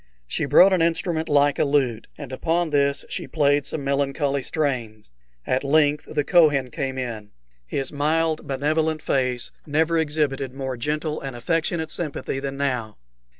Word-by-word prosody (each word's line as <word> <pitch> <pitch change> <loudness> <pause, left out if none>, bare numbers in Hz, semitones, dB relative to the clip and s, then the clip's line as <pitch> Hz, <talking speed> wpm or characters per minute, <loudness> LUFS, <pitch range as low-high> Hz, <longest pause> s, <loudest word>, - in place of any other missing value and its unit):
She - - -2
brought 190 +1 +6
an 180 - +2
instrument 165 -1 0
like 145 -1 +3
a - - +4
lute, 135 -6 0
and 140 -4 -8
upon 165 +4 0
this 140 -1 +1
she - - -4
played 145 -2 +2
some 150 - -3
melancholy 140 0 0
strains. 120 - -3 0.3
At 130 +2 0
length 145 +1 +2
the 145 - 0
Kohen 145 -6 +3
came 130 +2 -3
in. 115 -5 -5 0.4
His 135 - -3
mild, 155 +2 0
benevolent 155 +3 0
face 125 -2 0 0.2
never 160 +3 +2
exhibited 145 -4 -1
more 135 -1 -3
gentle 150 +5 -2
and 135 -2 -6
affectionate 160 +4 -1
sympathy 150 -4 -3
than 135 0 -4
now. 125 -6 -2
145 Hz, 150 wpm, -23 LUFS, 135-155 Hz, 0.4 s, brought